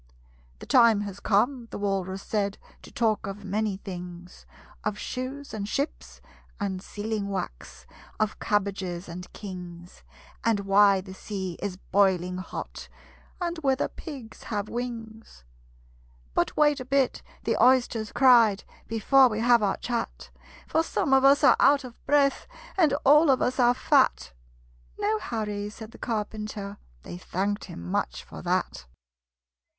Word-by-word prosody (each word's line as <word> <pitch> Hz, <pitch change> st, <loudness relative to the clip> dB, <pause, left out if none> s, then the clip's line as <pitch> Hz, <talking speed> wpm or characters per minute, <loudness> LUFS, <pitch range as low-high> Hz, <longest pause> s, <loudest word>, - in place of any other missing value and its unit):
"The -, -, -11 dB
time 230 Hz, -4 st, +5 dB
has 200 Hz, -1 st, -6 dB
come," 230 Hz, +5 st, +1 dB
the -, -, -6 dB
Walrus 195 Hz, -1 st, -2 dB
said, 200 Hz, -2 st, -1 dB, 0.2 s
"To -, -, -13 dB
talk 220 Hz, -4 st, 0 dB
of 195 Hz, +1 st, -7 dB
many 205 Hz, 0 st, -1 dB
things: 180 Hz, -2 st, -9 dB, 0.4 s
Of 210 Hz, -1 st, -2 dB
shoes 265 Hz, +5 st, -5 dB
and 205 Hz, -2 st, -4 dB
ships 280 Hz, +6 st, -4 dB, 0.4 s
and 190 Hz, -3 st, -2 dB
sealing 210 Hz, 0 st, -4 dB
wax 185 Hz, -, -6 dB, 0.3 s
Of 215 Hz, -1 st, -1 dB
cabbages 195 Hz, -3 st, -1 dB
and 180 Hz, +1 st, -8 dB
kings 180 Hz, -3 st, -9 dB, 0.4 s
And 225 Hz, -3 st, +2 dB
why 195 Hz, 0 st, +5 dB
the 190 Hz, 0 st, -10 dB
sea 190 Hz, -2 st, -5 dB
is 195 Hz, -2 st, -3 dB
boiling 185 Hz, -2 st, +1 dB
hot 185 Hz, -, -7 dB, 0.5 s
And 345 Hz, -2 st, -2 dB
whether 270 Hz, -3 st, +1 dB
pigs 270 Hz, -9 st, -10 dB
have 205 Hz, -2 st, -3 dB
wings." 225 Hz, -, -6 dB, 0.9 s
"But -, -, 0 dB
wait 295 Hz, -2 st, +4 dB
a 255 Hz, -, -6 dB
bit," 270 Hz, 0 st, +1 dB, 0.2 s
the -, -, 0 dB
Oysters 245 Hz, -4 st, +3 dB
cried, 235 Hz, -7 st, +5 dB, 0.2 s
"Before 255 Hz, +4 st, +5 dB
we 215 Hz, -1 st, -3 dB
have 240 Hz, 0 st, +5 dB
our 200 Hz, -2 st, +1 dB
chat; 240 Hz, -2 st, -4 dB, 0.4 s
For 320 Hz, -, +2 dB
some 305 Hz, -3 st, 0 dB
of 265 Hz, 0 st, +5 dB
us 275 Hz, +1 st, +5 dB
are -, -, +7 dB
out 280 Hz, 0 st, +5 dB
of 245 Hz, -2 st, -12 dB
breath, 280 Hz, -1 st, +3 dB, 0.3 s
And 320 Hz, -7 st, +3 dB
all 300 Hz, +3 st, +7 dB
of 265 Hz, -, +4 dB
us 255 Hz, +1 st, 0 dB
are 245 Hz, 0 st, +5 dB
fat!" 260 Hz, -, +2 dB, 0.6 s
"No 215 Hz, +1 st, 0 dB
hurry," 210 Hz, -2 st, -3 dB
said 220 Hz, +1 st, -10 dB
the -, -, -15 dB
Carpenter: 210 Hz, -2 st, -4 dB, 0.3 s
They 175 Hz, -, -8 dB
thanked 200 Hz, +3 st, -2 dB
him 85 Hz, -, -9 dB
much -, -, -2 dB
for -, -, -10 dB
that. 65 Hz, -, -2 dB
215 Hz, 145 wpm, -27 LUFS, 195-250 Hz, 0.9 s, are